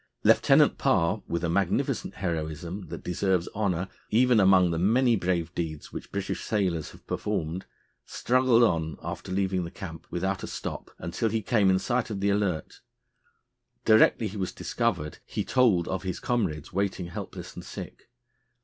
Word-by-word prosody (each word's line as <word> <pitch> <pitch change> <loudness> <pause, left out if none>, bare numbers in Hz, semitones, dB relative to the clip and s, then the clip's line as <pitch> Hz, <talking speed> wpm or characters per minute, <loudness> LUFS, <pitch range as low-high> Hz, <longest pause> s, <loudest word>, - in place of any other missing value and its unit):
Lieutenant - - +5
Parr, 85 +6 +2
with 85 0 -2
a - - +1
magnificent 95 +2 0
heroism 85 +1 -4
that 85 +1 -7
deserves 90 0 0
honour 95 -4 0 0.2
even 120 +1 +4
among 95 -3 +5
the 80 - -1
many 120 +6 +4
brave 90 -3 -1
deeds 80 -4 -5
which - - -7
British 100 -1 -3
sailors 90 -7 0
have - - -16
performed, 80 +4 -3 0.4
struggled 125 -1 +3
on 80 -7 +1
after - - -6
leaving 95 -1 0
the 85 - -5
camp 80 -3 -9
without 95 +2 -2
a - - -5
stop - - -6
until 85 +7 -2
he 110 0 -1
came 105 -3 +3
in 95 - +4
sight 120 +5 -1
of 105 -3 -3
the 100 +1 +2
Alert. 100 -6 -1 1.0
Directly 110 +1 +5
he 105 +1 -7
was 95 -2 -2
discovered 95 - -2
he - - -4
told 110 -10 +3
of 95 -1 -2
his 95 -2 -4
comrades 95 - -1
waiting 95 -1 -1
helpless 85 - -7
and - - -8
sick. - - -9
95 Hz, 160 wpm, -27 LUFS, 85-105 Hz, 1.0 s, Lieutenant